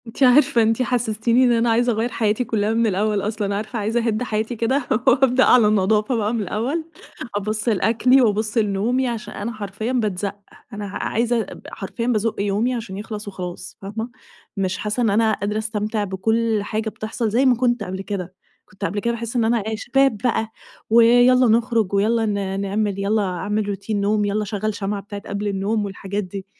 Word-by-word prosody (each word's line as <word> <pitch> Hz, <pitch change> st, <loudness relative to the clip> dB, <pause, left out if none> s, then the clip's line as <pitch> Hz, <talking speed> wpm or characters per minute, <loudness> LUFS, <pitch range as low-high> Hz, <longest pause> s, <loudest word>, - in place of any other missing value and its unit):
أنتِ 230 Hz, +4 st, -2 dB
عارفة 250 Hz, -2 st, +5 dB
أنتِ 225 Hz, +2 st, +2 dB
حسستيني 235 Hz, 0 st, +1 dB
إن 245 Hz, -, +4 dB
أنا 235 Hz, 0 st, +2 dB
عايزة 240 Hz, +2 st, +3 dB
أغيَّر 225 Hz, +2 st, -1 dB
حياتي 220 Hz, 0 st, 0 dB
كلها 215 Hz, -2 st, 0 dB
من 230 Hz, 0 st, +2 dB
الأول 205 Hz, +1 st, 0 dB
أصلًا، 205 Hz, -1 st, -2 dB
عارفة، 215 Hz, +3 st, -4 dB
عايزة 225 Hz, +3 st, 0 dB
أهِدّ 220 Hz, +2 st, 0 dB
حياتي 220 Hz, 0 st, -2 dB
كده 235 Hz, +5 st, 0 dB, 0.2 s
وأبدأ 260 Hz, 0 st, +5 dB
على 240 Hz, -4 st, +6 dB
نضافة 210 Hz, +3 st, +2 dB
بقى 215 Hz, 0 st, 0 dB
من 230 Hz, -, -1 dB
الأول، 245 Hz, -, -2 dB, 0.5 s
أبُصّ 215 Hz, +3 st, -1 dB
لأكلي 235 Hz, +5 st, +3 dB
وأبُصّ 215 Hz, -1 st, +1 dB
لنومي، 225 Hz, +5 st, +1 dB
علشان 235 Hz, -3 st, -5 dB
أنا 215 Hz, +3 st, -4 dB
حرفيًا 215 Hz, +2 st, -4 dB
باتزَقّ، 205 Hz, -6 st, -1 dB, 0.4 s
أنا 210 Hz, 0 st, -5 dB
ع 200 Hz, -, -5 dB
عايزة 235 Hz, +1 st, +1 dB
ب -, -, -11 dB
حرفيًا 230 Hz, +4 st, -5 dB
بازُق 225 Hz, -2 st, +1 dB
يومي 205 Hz, +5 st, 0 dB
علشان 220 Hz, -5 st, -5 dB
يخلص 210 Hz, 0 st, -6 dB
وخلاص، 180 Hz, -3 st, -7 dB
فاهمة؟ 220 Hz, +4 st, -5 dB, 0.5 s
مش 190 Hz, -1 st, -1 dB
حاسة 210 Hz, +4 st, -2 dB
إن 225 Hz, -, +3 dB
أنا 220 Hz, +2 st, +3 dB
قادرة 205 Hz, +1 st, -2 dB
أستمتع 215 Hz, 0 st, -2 dB
بكل 220 Hz, +3 st, 0 dB
حاجة 220 Hz, +1 st, -2 dB
بتحصل 220 Hz, +1 st, -3 dB
زي 245 Hz, +6 st, +2 dB
ما 255 Hz, -2 st, +5 dB
كُنت 240 Hz, -2 st, +1 dB
قبل 190 Hz, -1 st, -5 dB
كده، 190 Hz, -3 st, -5 dB, 0.3 s
كُنت 195 Hz, +1 st, -7 dB
قبل 205 Hz, -, -2 dB
كده 235 Hz, +3 st, -1 dB
باحس 235 Hz, +1 st, -5 dB
إن 235 Hz, -2 st, +2 dB
أنا 235 Hz, +1 st, +2 dB
إيه، 220 Hz, -, -1 dB
شباب 265 Hz, +1 st, +2 dB
بقى 225 Hz, -1 st, -1 dB, 0.4 s
ويالّا 245 Hz, +2 st, +6 dB
نخرج 225 Hz, -3 st, +2 dB
ويالّا 220 Hz, +3 st, +2 dB
ن 200 Hz, -2 st, -2 dB
نعمل، 200 Hz, 0 st, -1 dB
يالّا 210 Hz, +2 st, +1 dB
أعمل 200 Hz, +3 st, -2 dB
روتين 200 Hz, +1 st, -2 dB
نوم، 205 Hz, +1 st, +1 dB
يالّا 205 Hz, +1 st, 0 dB
أشغل 215 Hz, +1 st, -2 dB
شمعة 200 Hz, 0 st, -3 dB
بتاعة 200 Hz, 0 st, -8 dB
قبل 205 Hz, +1 st, -3 dB
النوم 205 Hz, +2 st, -1 dB
والحاجات 200 Hz, +1 st, -4 dB
دي، 190 Hz, +1 st, -7 dB
215 Hz, 185 wpm, -21 LUFS, 205-235 Hz, 0.5 s, على